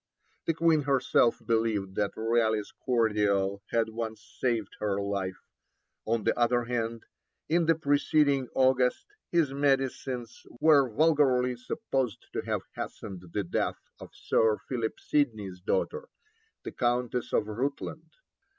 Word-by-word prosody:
The 165 - +1
Queen 165 -1 +3
herself 135 -4 +2
believed 110 -4 0
that 105 -1 0
Raleigh's 110 -2 +1
cordial 105 -5 +1
had 115 -1 +1
once 110 -1 -6
saved 115 -5 -1
her 100 -2 0
life; 100 -2 -2 0.7
on 115 -1 0
the - - +2
other 120 0 +2
hand, 115 -1 -3 0.4
in 165 0 +2
the 165 - +5
preceding 145 -2 +2
August 130 -1 +3 0.3
his 160 -6 +2
medicines 135 -3 -1 0.2
were 145 -4 +5
vulgarly 130 -3 +3
supposed 125 -1 -3
to - - -1
have - - -2
hastened 95 -4 -7
the 105 - -1
death 85 - -1 0.2
of - - -10
Sir 110 -1 +2
Philip 115 -4 -2
Sidney's 110 -11 -1
daughter, 460 - -1 0.5
the - - -5
Countess 120 0 -1
of - - +2
Rutland. 125 +7 -4
120 Hz, 125 wpm, -29 LUFS, 110-135 Hz, 0.7 s, the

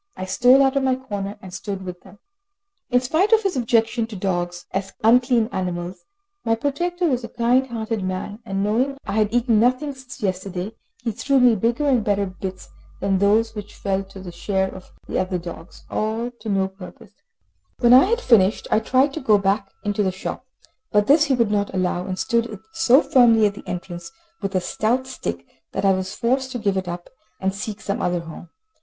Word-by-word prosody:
I 185 - -4
stole 250 +7 +5
out 270 0 +2
of 275 - +2
my 260 -1 +2
corner, 205 -6 -5
and 185 -1 -10
stood 195 -1 -5
with 180 -1 -7
them. 205 - -16 0.7
In 250 -1 +3
spite 320 - +1
of 445 0 +5
his 390 -3 0
objection 230 -1 +1
to 225 - -8
dogs, 175 -2 -2
as 195 0 -3
unclean 240 0 +4
animals, 180 -1 -4 0.4
my 225 0 +2
protector 345 +8 -1
was 255 -5 0
a 230 - -6
kind 245 +3 +2
hearted 225 -3 -3
man, 185 +3 -4
and 195 -3 -2
knowing 250 +7 +1
I - - -4
had 210 0 +1
eaten 235 -2 +3
nothing 255 +5 +2
since 260 -2 -11
yesterday, 190 0 -2 0.3
he 230 - 0
threw 265 +5 +1
me 250 -2 +6
bigger 235 +8 0
and 255 -5 +3
better 200 -1 +1
bits 185 0 -7 0.3
than 195 0 +1
those 215 +3 +3
which 210 -1 -8
fell 195 -1 -1
to 195 0 -12
the 185 -2 -8
share 190 +2 -1
of 185 - -12 0.2
the - - -1
other 185 0 -1
dogs. 170 -1 -9
When 225 +3 -2 1.6
I 260 +5 +8
had 470 +4 0
finished, 210 - +3
I - - +4
tried 260 +5 +2
to 320 - -4
go 220 -5 +4
back 195 0 0
into 205 0 0
the 190 -2 +1
shop, 185 +7 -6 0.4
but 210 0 +3
this 295 +4 +5
he 275 -3 +2
would 230 -4 +1
not 205 -1 0
allow, 180 -1 -1
and 185 -1 -3
stood 230 -2 0 0.2
so 270 -4 +5
firmly 230 -4 +5
at 205 - +1
the - - -12
entrance 175 -1 -6 0.3
with 195 -1 -3
a 185 - +2
stout 230 +8 0
stick, 85 - -5 0.3
that - - -1
I 195 - +6
was 190 +1 -3
forced 260 +2 0
to - - -2
give 205 -4 0
it 190 -1 -2
up, 175 0 -6 0.3
and 190 0 0
seek 205 +1 -5
some 200 -2 -3
other 175 -1 0
home. 165 +1 -10
215 Hz, 200 wpm, -22 LUFS, 190-250 Hz, 1.6 s, I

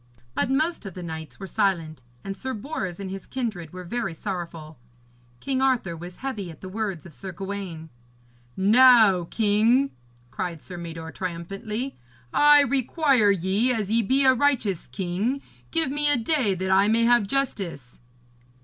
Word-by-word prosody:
But 145 - 0
most 305 - 0
of 190 - -9
the 180 - -7
knights 160 -2 -7
were 195 - -6
silent, 165 -7 -1 0.2
and 195 0 -5
Sir 260 +6 -5
Bors 205 - -5
and 190 -1 -5
his 195 -1 -7
kindred 215 - -4
were 185 0 -8
very 180 -2 -3
sorrowful. 165 - -6 0.6
King 265 -1 -1
Arthur 250 -10 +1
was 175 +2 -9
heavy 210 -9 -4
at 160 - -11
the 185 - -7
words 195 -5 -4
of 170 - -12
Sir 190 +6 -7
Gawaine. 185 -3 -6 0.7
'Now, 215 -3 +6
king,' 225 +7 +2 0.4
cried 170 -1 -4
Sir 180 - -9
Mador 165 -1 -7
triumphantly, 195 +9 -5 0.4
'I 295 0 +7
require 270 -3 +2
ye, 200 +6 +2
as 215 -4 -1
ye 230 +1 +4
be 265 +6 +2
a 260 - +7
righteous 240 - 0
king, 190 - -2 0.3
give 325 -5 +2
me 295 +1 +2
a 290 - +3
day 240 -5 +1
that 190 +1 -2
I 195 +2 +5
may 225 +2 +3
have 240 -3 +4
justice.' 195 - -3
200 Hz, 160 wpm, -25 LUFS, 175-255 Hz, 0.7 s, I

